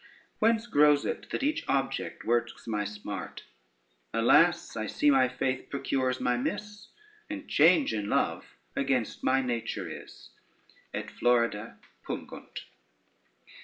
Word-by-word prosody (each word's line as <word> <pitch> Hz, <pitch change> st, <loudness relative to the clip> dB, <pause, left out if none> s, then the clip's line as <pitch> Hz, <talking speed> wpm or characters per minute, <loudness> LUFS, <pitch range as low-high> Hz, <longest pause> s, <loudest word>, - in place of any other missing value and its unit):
Whence 225 Hz, +1 st, +3 dB
grows 150 Hz, -8 st, +4 dB
it -, -, -4 dB
that -, -, -2 dB
each 310 Hz, +3 st, 0 dB
object 135 Hz, -1 st, -1 dB
works 120 Hz, +1 st, 0 dB
my 105 Hz, -2 st, -1 dB
smart? 105 Hz, 0 st, -6 dB, 0.7 s
Alas, 155 Hz, +10 st, +4 dB
I 110 Hz, -1 st, -3 dB
see 145 Hz, +7 st, +3 dB
my 130 Hz, -2 st, +5 dB
faith 130 Hz, +1 st, -2 dB
procures 130 Hz, -2 st, -1 dB
my 125 Hz, 0 st, +1 dB
miss, 210 Hz, +10 st, -4 dB, 0.4 s
And 300 Hz, -2 st, -6 dB
change 165 Hz, -5 st, +4 dB
in 105 Hz, -1 st, -2 dB
love -, -, -1 dB, 0.2 s
against 130 Hz, -4 st, -1 dB
my 135 Hz, +1 st, +3 dB
nature 115 Hz, -6 st, -3 dB
is. -, -, -10 dB, 0.6 s
_Et -, -, -4 dB
florida 115 Hz, -3 st, +1 dB, 0.3 s
pungunt. -, -, -7 dB
130 Hz, 125 wpm, -29 LUFS, 115-150 Hz, 0.7 s, my